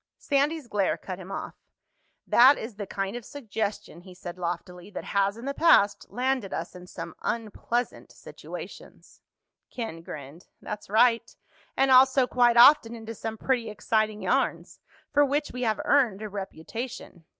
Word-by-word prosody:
Sandy's 290 +1 0
glare 205 -4 0
cut 185 -1 -7
him 185 +1 -9
off. - - -5 0.7
"That 260 +4 +6
is 220 -2 -7
the 205 -2 -5
kind 195 +3 -3
of 240 - -6
suggestion," 215 - -5
he 185 0 -14
said 180 0 -8
loftily, 180 +1 -5
"that 200 - -7
has, 200 +1 0
in 235 - -9
the 275 - -2
past, 205 -11 +4
landed 255 -4 -1
us - - -4
in 180 0 -12
some - - -8
unpleasant 235 +2 -3
situations." - - -11 0.5
Ken 225 -9 -6
grinned. 155 -1 -10
"That's 210 -1 -7
right. 230 +2 +3 0.5
And 270 0 +3
also, 260 0 +6
quite 240 -1 +3
often, 240 -2 +7
into 225 0 -7
some 225 0 -6
pretty 240 -2 -1
exciting 215 0 -1
yarns. - - -1 0.3
For 290 0 +5
which 290 +1 0
we 250 - -6
have 220 -3 0
earned 235 -8 +2
a 215 - -5
reputation. 195 0 -7
220 Hz, 155 wpm, -27 LUFS, 195-250 Hz, 0.7 s, often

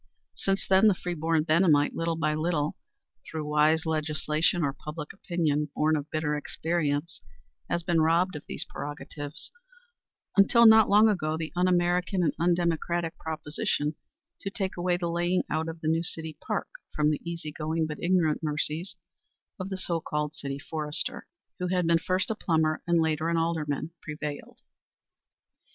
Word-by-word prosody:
Since 195 0 -1
then 190 +3 +6
the 205 - +5
free 180 0 -4
born 160 -1 +1
Benhamite, 155 -2 +3
little 165 0 -1
by 155 -1 0
little, 155 -1 0 0.5
through 155 -2 -4
wise 150 +2 +3
legislation 155 +1 0
or 140 -1 0
public 150 +1 -7
opinion, 155 -6 -1
born 155 +1 +2
of 150 0 -4
bitter 155 -1 -1
experience, 155 +1 -2 0.5
has 170 - -1
been 170 -1 +2
robbed 170 +3 +2
of 150 - -6
these 165 - -4
prerogatives 145 0 -7 0.8
until, 225 +4 +6
not 220 -1 +8
long 210 +2 +6
ago, 160 -7 0
the 160 -1 -5
un 180 +1 +2
American 180 +1 +2
and 165 - +2
undemocratic 170 -1 0
proposition 150 -1 -2 0.5
to 195 - -3
take 195 -1 -3
away 175 0 0
the 175 -1 -2
laying 175 +2 +1
out 160 +1 0
of 165 0 -8
the 155 - -3
new 160 +1 +2
city 160 -2 -4
park - - -1 0.3
from 150 0 +3
the 150 - -2
easy 170 -3 -5
going 160 +1 -1
but 150 -1 -6
ignorant 170 -4 +2
mercies 155 +4 0 0.6
of 185 +1 -4
the 190 - -3
so 170 -3 -2
called 150 0 -2
city 140 -2 -5
forester, 150 +1 -2 0.3
who 180 - -1
had 180 -1 +1
been 165 0 +4
first 185 +4 0
a - - -1
plumber 160 -5 +1
and 170 -1 +3
later 160 0 +1
an 170 - +1
alderman, 160 -2 -1
prevailed. 150 -1 -6
160 Hz, 165 wpm, -28 LUFS, 150-175 Hz, 0.8 s, not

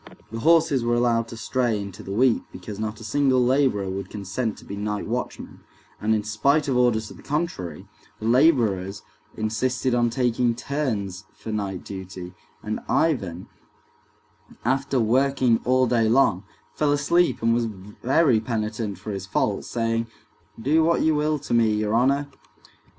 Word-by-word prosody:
The 115 - -4
horses 160 -3 +4
were 120 0 +1
allowed 120 -1 +2
to 115 - -9
stray 115 -1 0
into 100 -2 -7
the 95 - -8
wheat 120 +3 +3
because 100 +3 -8
not 110 0 -3
a - - -10
single 130 +3 +2
laborer 130 -6 +2
would 95 0 -4
consent 105 +3 -3
to - - -14
be 100 - -6
night 105 0 -3
watchman, 120 +3 -5 0.4
and 110 +1 +2
in 105 - -1
spite 140 +9 +1
of 135 - +1
orders 120 -3 +2
to - - -10
the - - -14
contrary, 140 - -3 0.3
the 110 - -6
laborers 115 - +2 0.3
insisted 120 +4 0
on 120 -1 +3
taking 120 -1 +1
turns 110 -9 -3
for 110 - -7
night 100 -4 -3
duty, 95 -2 -8 0.3
and 110 0 -3
Ivan, 100 - 0 1.2
after 135 +1 +1
working 125 +1 +3
all 130 +1 +4
day 115 -2 +2
long, 110 -6 +3 0.3
fell 150 -1 +1
asleep, 145 +1 +2
and 115 0 +4
was 120 0 +1
very 115 - +1
penitent 110 -2 -3
for 105 +4 -6
his 95 -1 -5
fault, 105 0 0
saying, 115 -1 -1 0.5
"Do 150 +7 +3
what 170 +1 +2
you 160 - +3
will 150 +1 +1
to 140 - -5
me, 115 -2 +3
your 105 0 -1
honor." 135 +5 +2
115 Hz, 160 wpm, -24 LUFS, 105-130 Hz, 1.2 s, horses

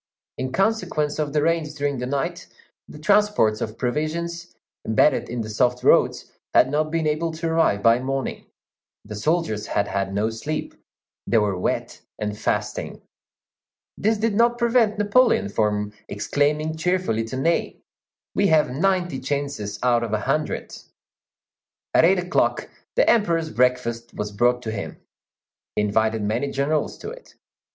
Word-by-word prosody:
In 130 0 -2
consequence 175 -6 0
of 150 -2 -1
the 150 0 +1
rains 160 -2 0
during 145 -2 -1
the 125 - -3
night, 140 0 -3 0.4
the - - -11
transports 200 - +2
of 110 +1 -4
provisions, 165 +7 -3 0.3
embedded 110 +7 +2
in 120 0 -3
the 110 - -5
soft 125 +3 +1
roads, - - +3 0.2
had 130 - +5
not 155 +1 +1
been 165 0 -1
able 155 +2 0
to 165 +1 -3
arrive 160 -11 +2
by 115 +1 +5
morning; 135 +1 -3 0.6
the 105 - -8
soldiers 110 -1 -1
had 100 - 0
had 100 0 -2
no 105 +3 0
sleep; 150 +8 -4 0.5
they 115 - +3
were 105 -3 +2
wet 90 - -3 0.2
and 105 -1 -3
fasting. - - -3 0.9
This 220 +2 +1
did 220 0 0
not 235 +3 +3
prevent 235 -3 +2
Napoleon 210 - +3
from 105 0 0
exclaiming 150 +8 0
cheerfully 180 -9 0
to 130 +3 -5
Ney, 165 +6 -1 0.5
"We 200 - +2
have 155 -6 +3
ninety 175 0 0
chances 140 -7 -3
out 120 -1 +3
of 115 -2 -3
a 105 - 0
hundred." 150 +7 -2 1.2
At - - +6
eight 190 +3 +4
o'clock 180 0 0 0.2
the - - +3
Emperor's 165 -8 +2
breakfast 120 -2 0
was 105 0 -4
brought 120 +4 +1
to 110 - -3
him. 100 -3 -5 0.8
He 105 - +1
invited 110 +1 +1
many 115 +7 -1
generals 145 +3 -1
to - - -7
it. - - -13
145 Hz, 150 wpm, -23 LUFS, 115-170 Hz, 1.2 s, At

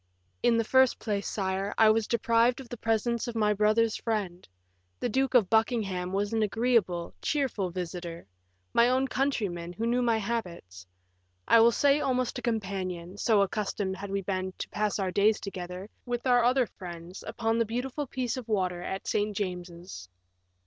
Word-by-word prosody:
"In 235 -1 +3
the 230 - +2
first 260 +2 +4
place, 205 -3 -2
sire, 195 0 -2
I 220 -1 +7
was 220 0 +1
deprived 235 +2 +2
of 260 -3 -10
the - - -5
presence 225 +2 0
of 240 - -5
my 210 -2 +2
brother's 215 +2 +2
friend. 200 -6 -3 0.5
The 245 - -1
Duke 265 +3 0
of 225 -6 +6
Buckingham 210 -5 +1
was 205 +3 -1
an 225 - +1
agreeable, 215 -5 +1
cheerful 260 -10 -1
visitor; 175 -1 -6 0.5
my 235 +1 +5
own 260 +1 +2
countryman, 205 -12 -1
who 220 +6 -3
knew 240 +2 +2
my 235 -2 +2
habits; 175 - -5 0.6
I 230 - +7
will 230 +1 +7
say 285 +4 +3
almost 255 -2 0
a - - -8
companion, 190 -6 -3
so 215 -4 +4
accustomed 200 -1 -2
had 200 +1 -7
we 195 0 -2
been 185 0 -2
to - - -5
pass 210 0 -1
our 190 -2 -1
days 205 +3 +3
together, 180 -1 -6 0.2
with 240 +1 -3
our 245 -2 +4
other 250 +1 +3
friends, 175 -3 -9
upon 225 0 0
the 230 - +3
beautiful 255 +5 -3
piece 250 -1 -2
of 250 -3 -6
water 185 -5 0
at 190 +2 -5
St. 210 -1 0
James's." 175 - -6
215 Hz, 175 wpm, -28 LUFS, 185-235 Hz, 0.6 s, I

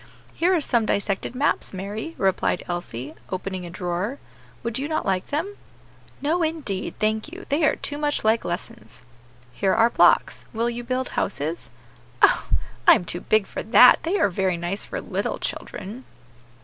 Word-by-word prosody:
"Here 350 +3 +2
are - - +3
some 235 -6 +1
dissected 200 +4 -1
maps, 275 -6 0
Mary," 210 - -5
replied 190 -1 +1
Elsie, 155 -6 -5 0.2
opening 185 -1 -4
a - - -8
drawer; 180 +7 -3 0.5
"would 235 +1 -2
you 280 - -2
not 310 - -1
like 190 -1 0
them?" 340 +8 -3 0.7
"No, 325 +5 +1
indeed, 310 - -2
thank 215 +6 0
you; 375 +3 -9
they 295 +3 +1
are - - +3
too 290 0 -5
much 295 -1 0
like 220 +1 +3
lessons." 120 - -6 0.5
"Here 190 +7 +1
are 230 +1 +4
blocks; - - +4
will 235 +1 0
you 240 +1 -5
build 255 +1 -2
houses?" 160 -2 -2 0.5
"Oh! - - +5 0.4
I - - +10
am 180 - -2
too 175 +1 -3
big 215 -1 +2
for - - -5
that; 245 +3 +7
they 350 +5 0
are 205 - +3
very 185 -1 0
nice 175 +4 -3
for - - -4
little - - -2
children." 210 +6 -6
215 Hz, 170 wpm, -24 LUFS, 185-285 Hz, 0.7 s, I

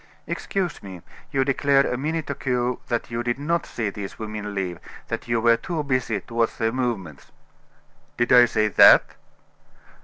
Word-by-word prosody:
"Excuse 185 -4 -3
me, 95 -4 -10 0.3
you 135 -1 +1
declared 140 0 +3
a - - -1
minute 155 +4 -3
ago 125 -3 -1
that 120 -1 -3
you 115 0 -2
did 120 +1 -1
not 165 +4 -1
see 110 -4 -3
these 100 -1 -7
women 105 -1 -6
leave: 90 -3 -3 0.3
that - - -4
you 120 -1 +1
were 115 0 +4
too 165 0 -4
busy 130 -6 -1
to 115 - -14
watch 115 -1 0
their 115 -1 0
movements." 115 - -4 0.9
"Did 120 - 0
I 125 -1 +8
say 110 -2 0
that?" - - +8
120 Hz, 165 wpm, -23 LUFS, 110-135 Hz, 0.9 s, I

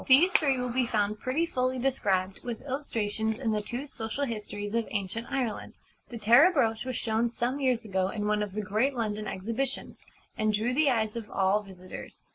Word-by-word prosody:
These 295 +8 +7
three 275 -4 +4
will 250 -1 -2
be 250 -1 +2
found 210 -2 0
pretty 270 +8 0
fully 255 -5 0
described, 200 -8 0
with 240 -1 -5
illustrations, 220 -6 -2
in 235 -4 -1
the 210 -1 0
two 240 +6 -4
Social 240 0 -3
Histories 205 -3 -5
of 230 -1 0
Ancient 205 +2 -3
Ireland. 250 -6 -3 0.3
The 240 - -6
Tara 240 - +7
Brooch 225 -8 +1
was 255 -1 -3
shown 225 +1 0
some 240 +4 -1
years 255 -4 +1
ago 190 -2 0
in 210 0 -3
one 210 0 +1
of 205 -2 -3
the 210 +1 -2
great 220 +7 +1
London 215 -3 -2
exhibitions, 230 +9 -3 0.3
and 215 0 +1
drew 225 +4 +1
the 295 +2 +4
eyes 220 -3 +1
of 225 -3 -5
all 195 +2 +2
visitors. 185 -2 -10
225 Hz, 195 wpm, -29 LUFS, 210-255 Hz, 0.3 s, These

